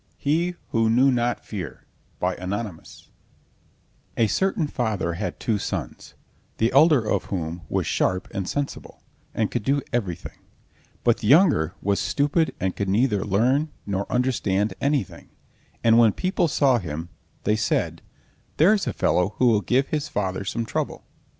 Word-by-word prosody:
HE 170 +5 0
WHO 115 -1 +2
KNEW 130 +4 +4
NOT 120 -1 -1
FEAR 90 - -7 0.4
Anonymous 95 -1 -4 1.1
A 115 - +4
certain 190 - +1
father 110 -11 -2
had 85 - -4
two 110 -3 0
sons, 85 - -5 0.4
the 115 +1 +2
elder 140 -4 +5
of - - 0
whom 85 -2 -4
was - - 0
sharp 90 0 0
and 95 -2 -3
sensible, 145 -1 -5 0.3
and 110 -2 0
could 120 - -1
do 140 +7 +1
everything, 90 -8 -3 0.6
but 120 -2 +3
the 105 - -3
younger 140 - +4
was 100 0 +1
stupid 145 +3 +1
and 95 0 -1
could 100 -1 -2
neither 105 -1 +2
learn 125 +10 +2 0.2
nor 100 0 -3
understand 110 -5 +1
anything, 140 - -1 0.5
and 115 0 +6
when 115 -3 +5
people 185 -2 0
saw 140 -4 +3
him 80 -2 -6 0.3
they 105 - +2
said: 110 - -1 0.6
"There's 195 +4 +4
a - - -1
fellow 90 +3 +1
who 125 - +4
will 105 -3 +3
give 130 +5 +1
his 150 -1 -1
father 95 -8 -2
some 115 +4 -2
trouble!" - - -3
115 Hz, 150 wpm, -24 LUFS, 95-140 Hz, 1.1 s, and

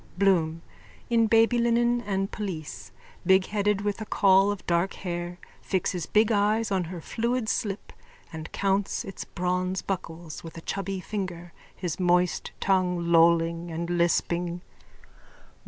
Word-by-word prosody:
BLOOM: 165 -4 +2 0.5
_(In 230 -2 +4
babylinen 235 +1 +3
and 195 -1 -1
pelisse, 180 -8 -6 0.3
bigheaded, 200 +2 +2
with 205 +1 -2
a - - -3
caul 195 0 +4
of 205 -1 -4
dark 170 +2 +1
hair, 175 -1 -4 0.2
fixes 180 -2 -1
big 215 +1 +3
eyes 215 +1 +2
on 185 -2 +1
her 175 +1 -6
fluid 235 +6 -1
slip 205 -2 -2 0.4
and 160 0 -7
counts 195 0 0
its 195 - -7
bronze 180 +1 -1
buckles 170 -4 -5
with 165 0 -9
a - - -7
chubby 195 +1 -3
finger, 175 -4 -5 0.2
his 180 -2 -4
moist 180 -1 +2
tongue 180 -3 +1
lolling 165 0 +4
and 170 +1 -3
lisping.) 175 0 0
185 Hz, 130 wpm, -27 LUFS, 170-205 Hz, 0.5 s, In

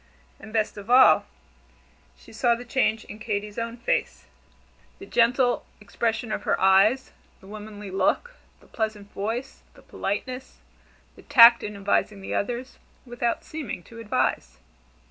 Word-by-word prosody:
And 220 - -12
best 215 -1 -1
of 205 +2 -10
all, 255 +1 +6 0.9
she - - -17
saw 240 -2 +2
the 245 +1 -9
change 225 -3 0
in 210 - -10
Katy's 210 -1 -4
own 230 +1 -4
face: 240 - -2 0.7
the 390 - -11
gentle 245 -2 +2 0.2
expression 225 +2 -3
of - - -2
her - - 0
eyes, 195 +7 +4 0.3
the - - -18
womanly 210 -1 -9
look, 480 - 0 0.3
the - - -20
pleasant 215 -2 -4
voice, 230 +7 -4
the - - -18
politeness, 255 +6 -5 0.6
the - - -15
tact 235 -4 +7
in 210 0 -6
advising 200 +1 0
the - - -5
others, 245 +5 -3 0.3
without 240 -1 -2
seeming 300 - -6
to 230 +5 -13
advise. 65 - -1
225 Hz, 145 wpm, -25 LUFS, 205-245 Hz, 0.9 s, tact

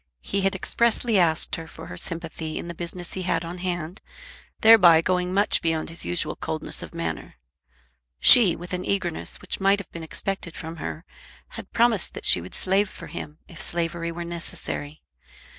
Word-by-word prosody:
He 200 - -1
had 195 0 +1
expressly 230 +1 +1
asked 165 -2 +2
her 165 0 -8
for - - -11
her 90 - -8
sympathy 160 - -5
in - - -5
the 170 - -5
business 175 +1 -5
he 190 - -3
had 175 -2 -1
on 175 +2 -6
hand, 175 -1 -4 0.6
thereby 190 -8 +8
going 180 +1 0
much 200 +2 +3
beyond 160 -2 -1
his 165 +1 -4
usual 85 0 -1
coldness - - -2
of - - -9
manner. 85 -1 -4 0.8
She, 205 - +7
with 175 +1 -8
an 180 0 -2
eagerness 185 -5 -1
which - - -3
might 195 +1 +4
have 200 - -9
been 170 - -7
expected 170 +2 -4
from 165 +1 -7
her, 160 +2 -6 0.4
had - - -10
promised 230 -5 +2
that - - -6
she 90 - +6
would 90 - -9
slave 195 +2 +1
for - - -10
him, 150 +1 -8
if 170 - -10
slavery 170 0 -2
were 170 +1 -6
necessary. 165 -3 -6
175 Hz, 180 wpm, -25 LUFS, 165-190 Hz, 0.8 s, thereby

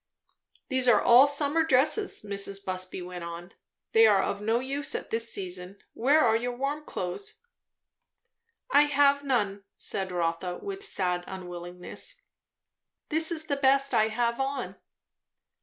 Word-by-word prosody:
"These 260 -2 +1
are 240 - +6
all 250 +4 +6
summer 290 +2 +2
dresses," 310 - +2
Mrs. 200 0 -2
Busby 185 0 -3
went 180 -1 -8
on. 170 +2 -8 0.4
"They 225 0 +6
are 200 -3 +4
of 200 - -3
no 225 +2 +1
use 275 +2 -2
at - - -6
this 230 +1 +1
season. 185 0 -4 0.2
Where 285 +7 +3
are 225 -1 +3
your 245 +2 -2
warm 285 +3 -3
clothes?" 180 +2 -5 1.4
"I 295 - +6
have 285 -1 +3
none," 205 -7 -1
said 190 -1 -3
Rotha, 175 +1 -2
with 395 0 -7
sad 180 - -1
unwillingness. 180 - -7 0.9
"This 320 +1 +4
is 315 -2 -2
the 285 -3 -2
best 275 0 +3
I 220 - +3
have 235 +2 -1
on." 270 0 -3
230 Hz, 140 wpm, -27 LUFS, 185-280 Hz, 1.4 s, are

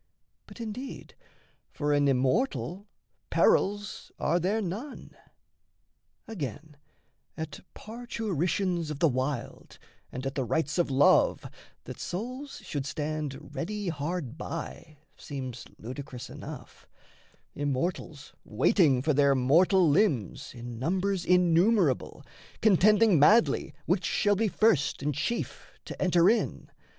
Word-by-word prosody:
But - - -13
indeed 235 +4 -7 0.6
For 145 -1 -1
an 145 0 +3
immortal 140 - 0 0.4
perils 205 +1 +1
are 170 +4 +1
there 195 +6 0
none. 215 +9 -6 1.1
Again, 155 - -6 0.6
at 160 -2 -6 0.2
parturitions 190 - -2
of 150 - -4
the 165 - +3
wild 130 -1 -3 0.3
And 130 +2 -6
at 135 - -2
the 135 - -1
rites 150 +6 -1
of 175 - +2
Love, 135 +1 +4 0.4
that - - -9
souls 255 +9 -6
should 145 -3 -4
stand 150 -1 -4
Ready 205 +2 -3
hard 155 -2 -4
by 155 -2 -7 0.2
seems 130 -4 -7
ludicrous 125 +1 -8
enough - - -10 0.7
Immortals 145 +2 -3
waiting 130 - +3
for 155 +1 +2
their 140 0 +4
mortal 170 +8 +4
limbs 145 - +1
In 120 -1 -8
numbers 190 +6 0
innumerable, 180 - +2 0.3
contending 210 -2 +5
madly 215 +11 +4
Which - - +1
shall 205 0 +2
be 220 +3 +1
first 195 -10 +2
and 150 +1 0
chief 235 - -4
to - - -8
enter 175 -1 +4
in! 230 +3 0
160 Hz, 115 wpm, -28 LUFS, 140-200 Hz, 1.1 s, contending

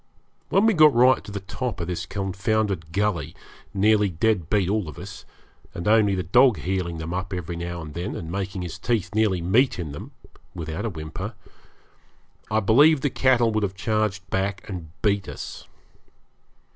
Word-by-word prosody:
When 195 - +3
we 225 - +5
got 155 -6 +6
right 125 +1 +5
to - - -9
the 100 -1 -5
top 115 +2 -4
of 85 - -2
this 90 0 -4
confounded 95 -3 -1
gully, 90 -6 -1 0.4
nearly 105 +1 +3
dead 90 -1 0
beat 100 -4 +2
all 100 -4 -1
of 75 - -10
us, - - -9 0.5
and 85 - -4
only 105 -2 +4
for 90 -1 -1
the - - -16
dog 120 +5 +5
heeling 90 -3 -2
them 80 +1 -5
up 95 +2 -3
every 90 -1 -4
now 85 0 -5
and 75 -1 -9
then, 85 +6 -4
and 80 0 -6
making 95 -1 -3
his 90 - -6
teeth 115 -6 -1
nearly 105 -5 +2
meet 120 +10 +3
in 80 -5 -4
them, 70 - -8 0.5
without 85 +4 -4
a - - 0
whimper, 95 +5 -6 1.1
I 110 0 +2
believe 140 +8 +5
the 145 - 0
cattle 120 -3 +3
would 110 0 0
have 100 -2 -2
charged 105 -2 -1
back 95 +1 -2
and 90 -6 -6
beat 100 -2 +1
us. - - -8
100 Hz, 185 wpm, -24 LUFS, 85-110 Hz, 1.1 s, got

